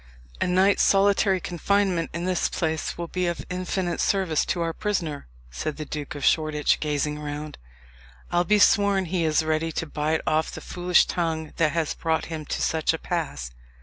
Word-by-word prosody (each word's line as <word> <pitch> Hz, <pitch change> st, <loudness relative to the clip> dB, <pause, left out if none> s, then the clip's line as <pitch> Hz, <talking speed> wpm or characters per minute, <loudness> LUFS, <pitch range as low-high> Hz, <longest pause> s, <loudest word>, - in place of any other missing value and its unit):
"A -, -, +2 dB
night's 190 Hz, +3 st, +3 dB
solitary 195 Hz, -1 st, +4 dB
confinement 180 Hz, -1 st, 0 dB
in 170 Hz, +1 st, -4 dB
this 185 Hz, -1 st, +1 dB
place 160 Hz, -1 st, -2 dB
will 170 Hz, 0 st, -4 dB
be 180 Hz, +1 st, -1 dB
of 175 Hz, -, -3 dB
infinite 180 Hz, -1 st, -2 dB
service 185 Hz, -6 st, +1 dB
to 175 Hz, -, -1 dB
our 165 Hz, 0 st, -2 dB
prisoner," 170 Hz, -, -2 dB, 0.2 s
said 150 Hz, -, -4 dB
the 155 Hz, -, -5 dB
Duke 150 Hz, -1 st, -6 dB
of 145 Hz, -, -3 dB
Shoreditch, 155 Hz, -2 st, +2 dB
gazing 150 Hz, 0 st, -1 dB
around. 150 Hz, 0 st, -6 dB, 0.7 s
"I'll 175 Hz, 0 st, +3 dB
be 210 Hz, +4 st, +3 dB
sworn 200 Hz, -2 st, +4 dB
he 175 Hz, 0 st, -1 dB
is 155 Hz, 0 st, +2 dB
ready 160 Hz, +1 st, 0 dB
to 165 Hz, -, -2 dB
bite 155 Hz, +1 st, -1 dB
off 155 Hz, +1 st, +1 dB
the -, -, -7 dB
foolish 180 Hz, 0 st, +2 dB
tongue 160 Hz, -3 st, -2 dB
that 155 Hz, -2 st, +2 dB
has 165 Hz, -3 st, 0 dB
brought 160 Hz, -1 st, -1 dB
him 155 Hz, -1 st, -5 dB
to -, -, -2 dB
such 160 Hz, 0 st, +1 dB
a -, -, -4 dB
pass." 145 Hz, -, -3 dB
165 Hz, 180 wpm, -25 LUFS, 155-180 Hz, 0.7 s, solitary